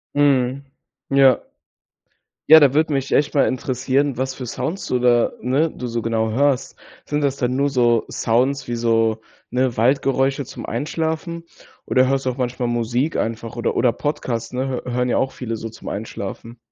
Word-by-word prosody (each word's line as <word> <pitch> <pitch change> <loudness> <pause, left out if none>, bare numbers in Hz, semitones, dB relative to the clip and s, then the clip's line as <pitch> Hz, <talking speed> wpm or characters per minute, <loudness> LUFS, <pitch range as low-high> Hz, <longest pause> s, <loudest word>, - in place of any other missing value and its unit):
Mhm. 140 -2 +2 0.4
Ja. 135 -2 +5 1.1
Ja, 160 +1 +10
da 140 -3 +4
würde 155 +1 +2
mich 135 -1 -1
echt 145 - +2
mal 145 - +3
interessieren, 130 +1 0
was 130 0 -2
für 130 - -6
Sounds 165 - -4
du 125 - 0
da, 120 -1 +3
ne 140 +7 +1
du 125 - -6
so 115 0 -2
genau 110 -1 0
hörst. 135 +1 0 0.3
Sind 150 0 -1
das 140 -1 0
dann 125 0 -1
nur 140 +1 +2
so 120 -4 +2
Sounds 130 +4 0
wie 120 - -2
so, 115 -1 +1 0.3
ne, 125 -1 0
Waldgeräusche 135 +3 +2
zum - - -9
Einschlafen? 160 - -3 0.4
Oder 130 0 +3
hörst 135 0 0
du 130 - +1
auch 125 - -10
manchmal 125 -1 -2
Musik 120 +5 -1
einfach 115 0 -3
oder 120 - -1
oder 120 -1 +3
Podcasts, 120 -6 -3
ne? 130 +2 -2 0.2
Hö 125 - -4
hören 125 +1 0
ja - - +1
auch 135 - 0
viele 115 -3 -5
so 115 +1 -6
zum 110 - -13
Einschlafen. 110 +2 -6
130 Hz, 180 wpm, -21 LUFS, 120-140 Hz, 1.1 s, Ja